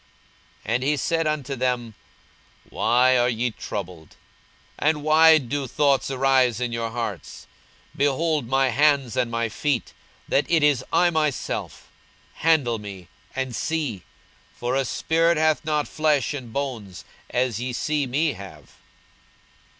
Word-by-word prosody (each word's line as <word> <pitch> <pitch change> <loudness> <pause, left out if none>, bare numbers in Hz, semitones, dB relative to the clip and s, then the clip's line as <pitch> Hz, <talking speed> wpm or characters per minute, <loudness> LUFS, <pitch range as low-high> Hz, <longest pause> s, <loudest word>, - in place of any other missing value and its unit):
42:024:038 110 - -1
And 125 +2 0
he 145 +2 +1
said 165 +3 0
unto 145 -3 -2
them, 125 -3 -1 0.8
Why 125 +1 +3
are 120 0 +3
ye 120 +1 -1
troubled? 90 -7 -7 0.6
and 150 -1 +1
why 160 +1 +6
do 140 0 -3
thoughts 140 +1 +1
arise 130 -3 +2
in 125 -1 -2
your 115 -1 -2
hearts? 110 -7 -6 0.5
42:024:039 - - -17
Behold 145 0 +1
my 135 +1 +2
hands 140 -2 +2
and 125 -2 0
my 115 0 -1
feet, 130 +2 -2 0.3
that 140 - +1
it 165 -3 +3
is 145 -4 +3
I 175 -1 +3
myself: 155 -4 -2 0.5
handle 140 -8 +2
me, 95 -4 -10 0.3
and 130 -2 -3
see; 145 - -2 0.5
for 120 +2 -2
a 135 0 +1
spirit 165 +5 +1
hath 155 0 +2
not 150 -1 -1
flesh 150 -4 +1
and 125 -5 -7
bones, 115 -9 -5 0.2
as 120 -3 0
ye 125 +1 -3
see 145 +3 -1
me 145 +4 0
have. 100 0 -12
130 Hz, 140 wpm, -24 LUFS, 120-150 Hz, 0.8 s, why